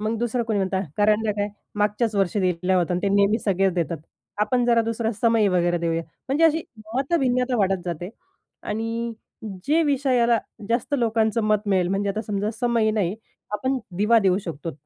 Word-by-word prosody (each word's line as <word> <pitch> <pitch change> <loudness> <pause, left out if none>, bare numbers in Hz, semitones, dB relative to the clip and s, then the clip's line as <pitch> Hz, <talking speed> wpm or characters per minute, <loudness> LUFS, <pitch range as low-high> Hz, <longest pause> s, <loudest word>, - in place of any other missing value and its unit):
मग 215 +2 -1
दुसरं 240 0 0
कोणी 220 -2 0
म्हणतं 190 -1 0 0.2
करंडा 210 +1 +2
काय 205 0 -2 0.3
मागच्याच 210 +2 +1
वर्षी 195 0 +1
दिला 180 0 +1
होता 175 0 +1
आणि 180 - 0
ते 200 - +2
नेहमी 200 +3 +3
सगळेच 195 -2 +1
देतात. 170 -2 -1 0.4
आपण 245 +3 +2
जरा 235 -1 +4
दुसरा 225 0 -1
समई 225 0 +2
वगैरे 175 -1 +1
देऊया. 165 0 -1 0.3
म्हणजे 290 +5 +3
अशी 320 0 +3 0.3
मतभिन्नता 260 -3 +1
वाढत 195 -3 +1
जाते 175 0 -4 0.5
आणि 230 +2 -3 0.5
जे 320 +3 +3
विषयाला 255 -5 +2 0.3
जास्त 235 +5 0
लोकांचं 225 -1 +1
मत 210 -1 +1
मिळेल 185 -3 +2
म्हणजे 195 +1 0
आता 215 +2 -3
समजा 205 0 -1
समई 235 -3 +2
नाही 200 -4 0 0.4
आपण 260 +5 0 0.2
दिवा 220 +3 +4
देऊ 190 -2 +2
शकतो. 165 -1 -5
215 Hz, 170 wpm, -24 LUFS, 190-235 Hz, 0.5 s, जरा